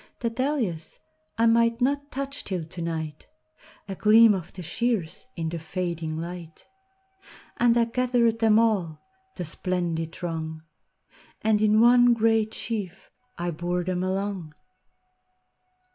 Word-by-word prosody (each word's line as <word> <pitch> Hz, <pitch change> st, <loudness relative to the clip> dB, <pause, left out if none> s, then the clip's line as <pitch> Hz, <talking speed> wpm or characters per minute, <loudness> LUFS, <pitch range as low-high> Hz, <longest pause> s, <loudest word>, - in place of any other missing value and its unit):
The 235 Hz, -2 st, -1 dB
dahlias 235 Hz, -, -2 dB, 0.4 s
I 230 Hz, -, +3 dB
might 230 Hz, 0 st, +3 dB
not 285 Hz, +3 st, 0 dB
touch 275 Hz, +1 st, -5 dB
till 185 Hz, -4 st, -3 dB
to 170 Hz, +2 st, -9 dB
night!A 155 Hz, 0 st, -8 dB
gleam 215 Hz, +3 st, +6 dB
of 180 Hz, -4 st, -5 dB
the 180 Hz, -, -8 dB
shears 215 Hz, +1 st, -2 dB
in 165 Hz, -2 st, -3 dB
the 170 Hz, 0 st, -4 dB
fading 165 Hz, -1 st, -4 dB
light, 170 Hz, -1 st, -8 dB, 0.9 s
And 235 Hz, 0 st, +4 dB
I 235 Hz, -, +4 dB
gathered 235 Hz, -1 st, +1 dB
them 220 Hz, -1 st, +4 dB
all,—the 225 Hz, -, -2 dB
splendid 165 Hz, -1 st, -2 dB
throng, 160 Hz, -2 st, -5 dB, 0.8 s
And 215 Hz, -1 st, +2 dB
in 215 Hz, 0 st, +4 dB
one 245 Hz, 0 st, +6 dB
great 225 Hz, -1 st, +2 dB
sheaf 195 Hz, -5 st, -5 dB, 0.3 s
I 175 Hz, 0 st, -2 dB
bore 175 Hz, +2 st, -2 dB
them 180 Hz, 0 st, -2 dB
along.. 190 Hz, -4 st, -3 dB
195 Hz, 125 wpm, -26 LUFS, 170-230 Hz, 0.9 s, gleam